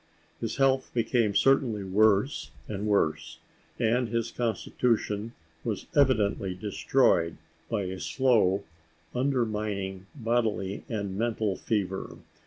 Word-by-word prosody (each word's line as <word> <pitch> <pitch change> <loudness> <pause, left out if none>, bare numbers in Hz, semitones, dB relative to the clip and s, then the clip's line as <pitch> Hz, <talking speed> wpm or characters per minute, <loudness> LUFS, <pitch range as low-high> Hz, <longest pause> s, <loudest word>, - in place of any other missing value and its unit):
His 115 -1 -3
health 135 -1 +2
became 115 -3 +1
certainly 130 -6 +3
worse 105 +6 +2 0.2
and 105 0 -3
worse, 80 -6 0 0.4
and 120 +1 +1
his 115 0 -1
constitution 115 -2 -1 0.3
was 110 -4 -3
evidently 105 -9 +2
destroyed 90 -4 +2 0.3
by 105 -3 0
a 95 0 -5
slow, 100 +1 +2 0.5
undermining 105 -7 -1
bodily 115 -6 -1
and 100 -4 -3
mental 110 -4 0
fever. 95 -3 -2
110 Hz, 100 wpm, -28 LUFS, 100-120 Hz, 0.5 s, certainly